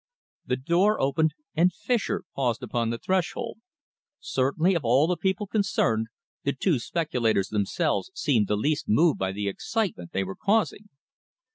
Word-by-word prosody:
The 125 - +1
door 175 +10 +2
opened, 150 +4 +1 0.2
and 175 +3 +4
Fischer 210 +4 -1
paused 125 -2 0
upon 120 -1 -1
the 115 - -2
threshold. 190 - -2 0.6
Certainly, 140 +8 +1
of 170 -5 -1
all 125 +5 +4
the 180 +2 +1
people 190 +3 -1
concerned, 155 - +1 0.4
the 140 - 0
two 145 0 +1
speculators 115 - 0
themselves 110 - 0
seemed 115 -9 +2
the 105 - +1
least 145 +7 -1
moved 155 +8 +4
by 95 0 0
the 100 +1 -3
excitement 170 - -2
they 95 - 0
were 95 0 -6
causing. 210 0 0
145 Hz, 150 wpm, -26 LUFS, 115-185 Hz, 0.6 s, and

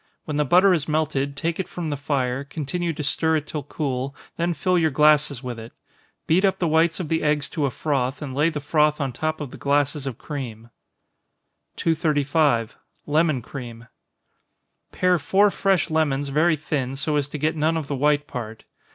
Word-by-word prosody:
When 150 -2 -3
the 150 - +2
butter 185 +7 +5
has 160 -5 +1
melted, 145 -3 -1
take 165 +3 -2
it 190 - -2
from 165 -3 -4
the - - -1
fire, 135 -2 -1
continue 160 +4 -3
to 150 -1 -5
stir 160 +3 +1
it 155 -1 -1
till 150 - -4
cool, 140 -2 -3 0.2
then 170 0 -1
fill 180 +5 +1
your 160 -1 +3
glasses 150 -2 +3
with 120 -2 -5
it. 115 +1 -10 0.5
Beat 175 +4 +3
up 195 -1 +3
the 175 - 0
whites 165 +2 +2
of 175 - -3
the 160 +1 0
eggs 150 -1 0
to 150 -5 0
a - - -1
froth, 135 -2 -1
and 140 -4 -6
lay 150 +5 +2
the 155 -3 -4
froth 150 +1 +2
on 135 -3 -2
top 155 +5 -2
of 145 -4 -6
the - - -10
glasses 145 0 0
of 125 -4 -4
cream. 115 -6 -7 1.0
235. 150 -7 +1 0.3
Lemon 155 -4 +1
Cream. 120 -3 -8 1.1
Pare 180 -1 +2
four 200 +7 +3
fresh 190 -4 +1
lemons 145 -3 +1
very 155 +4 +3
thin, 140 -3 -3
so 150 +2 -1
as 145 -1 0
to 150 - -5
get 155 +3 0
none 160 +1 +1
of 160 - -3
the 140 - -3
white 145 +2 +2
part. 115 -5 -7
150 Hz, 195 wpm, -23 LUFS, 140-160 Hz, 1.1 s, butter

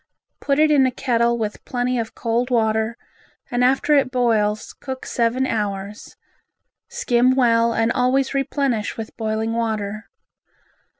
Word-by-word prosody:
Put 275 -1 0
it 310 0 +4
in 275 -3 +5
a - - -1
kettle 235 -2 +1
with 215 -2 -4
plenty 245 0 -1
of 225 -1 -5
cold 235 +2 -1
water 220 -1 +1 0.5
and 245 0 +1
after 270 +4 +3
it 275 -3 +3
boils 220 -4 0
cook 260 -1 -7
seven 240 +2 0
hours, 205 -3 -4 0.7
skim 255 - +2
well 235 -2 +3
and 225 0 +1
always 260 +3 +1
replenish 275 -5 -1
with 225 -1 -7
boiling 220 0 -2
water. 215 -2 -3
235 Hz, 135 wpm, -21 LUFS, 220-260 Hz, 0.7 s, in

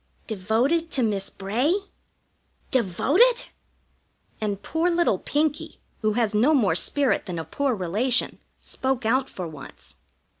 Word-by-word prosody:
"Devoted 230 - 0
to 260 - +1
Miss 200 -3 -1
Bray? 235 - 0 1.0
Devoted!" 285 - +3 0.9
And 205 -2 -2
poor 325 +3 0
little 340 - +2
Pinkie, 295 0 -1 0.2
who 215 -1 +1
has 225 -2 +1
no 250 +9 +4
more 210 - +3
spirit 255 - +1
than 180 -2 -4
a 160 - -4
poor 280 -3 -1
relation, 215 +7 0 0.2
spoke 260 -3 -2
out 260 +4 +2
for 180 -2 -6
once. 150 -4 -10
240 Hz, 125 wpm, -25 LUFS, 200-285 Hz, 1.0 s, no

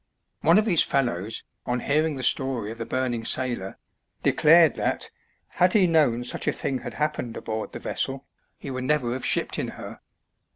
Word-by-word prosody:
One 165 +4 +5
of 215 - +3
these 180 -8 +4
fellows, 115 -6 -1 0.2
on 125 0 -1
hearing 155 +1 +1
the 130 - -5
story 125 -5 0
of 115 - -9
the 115 - -4
burning 125 -3 -1
sailor, 120 -6 0 0.5
declared 160 0 +5
that, - - -2 0.4
had 180 +1 +2
he 205 -4 +5
known 150 -8 +2
such 125 - -4
a - - +4
thing 130 -2 -3
had - - -8
happened 150 -6 -2
aboard 110 -1 -4
the - - -7
vessel, 135 +1 -3 0.3
he 140 - -7
would 130 0 -4
never 130 -5 +1
have 130 - -5
shipped - - 0
in - - -2
her. - - -9
130 Hz, 180 wpm, -25 LUFS, 120-150 Hz, 0.5 s, One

